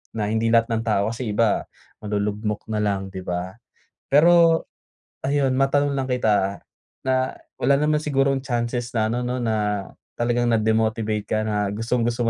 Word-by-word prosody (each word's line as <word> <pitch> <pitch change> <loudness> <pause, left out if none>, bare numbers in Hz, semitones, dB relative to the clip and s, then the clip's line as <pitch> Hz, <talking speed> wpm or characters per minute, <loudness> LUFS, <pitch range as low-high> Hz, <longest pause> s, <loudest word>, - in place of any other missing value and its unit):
na 105 -2 -1
hindi 110 +1 +1
lahat 115 0 +4
ng 115 0 0
tao, 100 0 +2
kasi 115 -2 -4
iba 110 -1 +2 0.3
malulugmok 105 0 -2
nalang, 100 -3 -1
'di 95 - -6
ba? 90 +3 -5 0.5
Pero, 165 +2 +5 0.6
ayun 140 -1 +2
matanong 140 +1 +2
lang 130 - -1
kita 105 -6 +1 0.4
na, 130 0 0 0.2
wala 140 - +3
naman 150 +1 +2
sigurong 135 -2 +1
chances 120 -1 -2
na 110 -1 +1
ano 120 +1 -2
'no, 125 0 -2
na 105 -3 -1 0.3
talagang 120 0 0
na-demotivate 110 -1 +1
ka 110 0 0
na 105 -1 0
gustong-gusto 120 +1 -1
115 Hz, 145 wpm, -23 LUFS, 105-130 Hz, 0.6 s, Pero